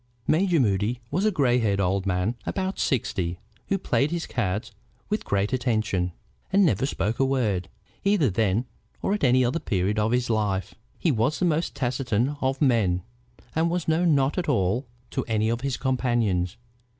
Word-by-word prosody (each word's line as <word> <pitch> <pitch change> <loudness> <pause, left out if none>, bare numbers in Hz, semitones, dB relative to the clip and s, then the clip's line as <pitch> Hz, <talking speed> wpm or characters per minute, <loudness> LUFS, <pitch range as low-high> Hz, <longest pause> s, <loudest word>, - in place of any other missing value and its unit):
Major 170 +3 +3
Moody 105 +1 +1
was 185 +8 +1
a 215 - +4
gray 130 -8 +2
headed 100 -4 +1
old 95 +1 0
man 90 +1 +1
of 120 - -3 0.2
about 190 0 -2
sixty, 90 -9 -1 0.3
who 195 - +1
played 150 -6 +1
his 170 +1 -2
cards 110 0 -2 0.4
with 210 +1 -1
great 100 +4 0
attention, 110 -8 0 0.4
and 200 0 +5
never 130 - +2
spoke 110 -3 -2
a - - +4
word, 110 -10 0 0.3
either 200 -8 +3
then 110 +3 +1 0.4
or 195 - +1
at 210 - -2
any 130 -1 +4
other 130 +7 0
period 100 - 0
of 105 +1 +1
his 125 0 +1
life. 105 -4 0 0.2
He 165 - +1
was 125 +5 +1
the 185 - +1
most 165 0 0
taciturn 125 0 0
of 135 +2 0
men, 100 -9 +2 0.5
and 165 +2 +2
was 175 -1 -2
known 160 0 +3
not 140 +5 +1
at 170 - -2
all 120 +1 +1 0.2
to - - -1
any 110 -1 +1
of 120 +1 -1
his 135 -1 -1
companions. 120 -9 0
120 Hz, 180 wpm, -25 LUFS, 105-145 Hz, 0.5 s, and